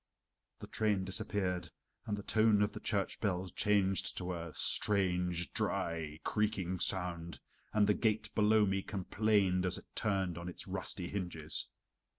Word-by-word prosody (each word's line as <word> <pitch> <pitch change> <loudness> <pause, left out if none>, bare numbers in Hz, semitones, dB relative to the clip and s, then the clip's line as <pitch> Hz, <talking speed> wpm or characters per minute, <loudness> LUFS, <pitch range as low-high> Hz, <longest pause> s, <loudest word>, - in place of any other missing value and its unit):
The - - -8
train 105 -3 0
disappeared, 95 -3 -1 0.4
and 105 - -1
the 100 - -6
tone 110 -1 +4
of 105 - 0
the - - -7
church 100 -2 -1
bells 95 -3 -1
changed 95 -1 +1
to 90 0 -2
a 85 -1 -5
strange, 90 -3 +2
dry, 80 -2 -1
creaking 95 -4 0
sound, 85 -5 -2 0.3
and 105 -1 +4
the 105 - +4
gate 110 0 0
below 105 0 +4
me 95 0 0
complained 95 -1 +1
as 90 - 0
it - - -11
turned 95 -5 0
on 85 +1 -5
its 90 - -7
rusty 90 - -3
hinges. 90 -5 -1
95 Hz, 150 wpm, -34 LUFS, 90-105 Hz, 0.4 s, tone